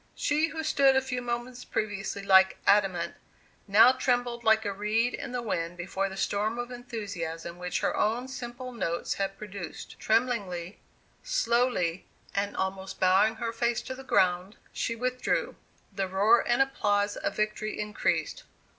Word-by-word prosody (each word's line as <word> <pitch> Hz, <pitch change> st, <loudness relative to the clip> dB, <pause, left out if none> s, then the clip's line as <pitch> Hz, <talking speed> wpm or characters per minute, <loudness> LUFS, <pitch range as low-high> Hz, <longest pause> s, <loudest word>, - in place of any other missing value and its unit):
She 305 Hz, +2 st, +1 dB
who 320 Hz, 0 st, -5 dB
stood 275 Hz, -3 st, +4 dB
a 265 Hz, -, +4 dB
few 250 Hz, -1 st, -3 dB
moments 240 Hz, +1 st, -4 dB
previous 210 Hz, -1 st, -3 dB
like 190 Hz, -1 st, +5 dB
adamant, 195 Hz, -3 st, +3 dB, 0.5 s
now 215 Hz, +5 st, +7 dB
trembled 245 Hz, -2 st, 0 dB
like 220 Hz, -1 st, +4 dB
a 200 Hz, -, -1 dB
reed 215 Hz, +4 st, 0 dB
in 275 Hz, -3 st, -5 dB
the 245 Hz, -1 st, -3 dB
wind 175 Hz, -5 st, -2 dB
before 190 Hz, +2 st, -2 dB
the 190 Hz, -, -8 dB
storm 210 Hz, +4 st, 0 dB
of 240 Hz, +1 st, -4 dB
enthusiasm 180 Hz, -9 st, -6 dB
which 180 Hz, 0 st, -2 dB
her -, -, 0 dB
own 235 Hz, +4 st, 0 dB
simple 255 Hz, -1 st, -7 dB
notes 170 Hz, -8 st, -2 dB
had 195 Hz, 0 st, -2 dB
produced. 200 Hz, -3 st, -8 dB
Tremblingly, 205 Hz, -6 st, 0 dB, 0.4 s
slowly, 240 Hz, -, 0 dB, 0.3 s
and 200 Hz, +1 st, -1 dB
almost 190 Hz, 0 st, -3 dB
bowing 190 Hz, +4 st, +4 dB
her 230 Hz, +1 st, -3 dB
face 235 Hz, 0 st, 0 dB
to 260 Hz, -, -5 dB
the 265 Hz, +1 st, -10 dB
ground, 185 Hz, -4 st, +2 dB, 0.2 s
she 230 Hz, -, -2 dB
withdrew. 250 Hz, +2 st, -1 dB, 0.4 s
The 195 Hz, -1 st, -1 dB
roar 205 Hz, +5 st, +4 dB
and 240 Hz, +2 st, +4 dB
applause 205 Hz, -6 st, 0 dB
of -, -, -3 dB
victory 215 Hz, 0 st, -2 dB
increased. 210 Hz, 0 st, -1 dB
215 Hz, 155 wpm, -28 LUFS, 195-245 Hz, 0.5 s, now